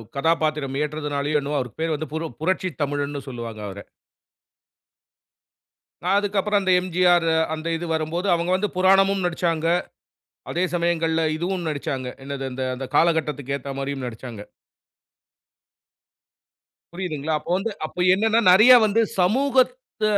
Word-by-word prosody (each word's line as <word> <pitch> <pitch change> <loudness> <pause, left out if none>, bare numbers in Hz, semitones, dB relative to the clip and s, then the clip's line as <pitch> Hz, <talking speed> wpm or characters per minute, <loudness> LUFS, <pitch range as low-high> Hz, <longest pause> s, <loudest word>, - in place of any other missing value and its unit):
கதாபாத்திரம் 155 -2 0
ஏற்றதனாலயோ, 150 -1 -2
என்னவோ 145 +1 -2
அவருக்கு 125 -1 -7
பேரு 165 0 0
வந்து 150 0 -5
பு 160 - -1 0.2
புரட்சி 185 +2 0
தமிழன்னு 145 0 -2
சொல்லுவாங்க 115 -4 -7
அவர. 100 0 -8 2.3
அ - - +2
அதுக்கு 205 0 -1
அப்பறம் 210 +1 +1
அந்த 185 -1 +1
எம்.ஜி.ஆரு 175 -2 +2 0.2
அந்த 160 +1 -5
இது 175 - -5
வரும்போது, 160 +4 -2
அவுங்க 170 +1 0
வந்து 205 +2 -1
புராணமும் 195 +1 +3
நடிச்சாங்க. 170 -2 -1 0.9
அதே 175 +2 0
சமயங்கள்ல 165 -1 +1
இதுவும் 175 +1 -3
நடிச்சாங்க. 135 -3 -3 0.2
என்னது 135 -1 -5
அந்த 130 +1 -5
அந்த 135 +1 -5
காலகட்டத்துக்கு 150 -5 +1
ஏத்தா 140 0 -7
மாரியும் 135 -1 -4
நடிச்சாங்க. 120 -2 -8 2.5
புரியுதுங்களா? 160 -4 -3
அப்ப 150 - -12
வந்து 215 +4 -3
அப்ப 155 - -11 0.2
என்னான்னா 220 +4 +2
நெறையா 220 +7 +8
வந்து 215 +2 +2 0.2
சமூகத்த 255 +4 +1
165 Hz, 125 wpm, -23 LUFS, 140-185 Hz, 2.5 s, நெறையா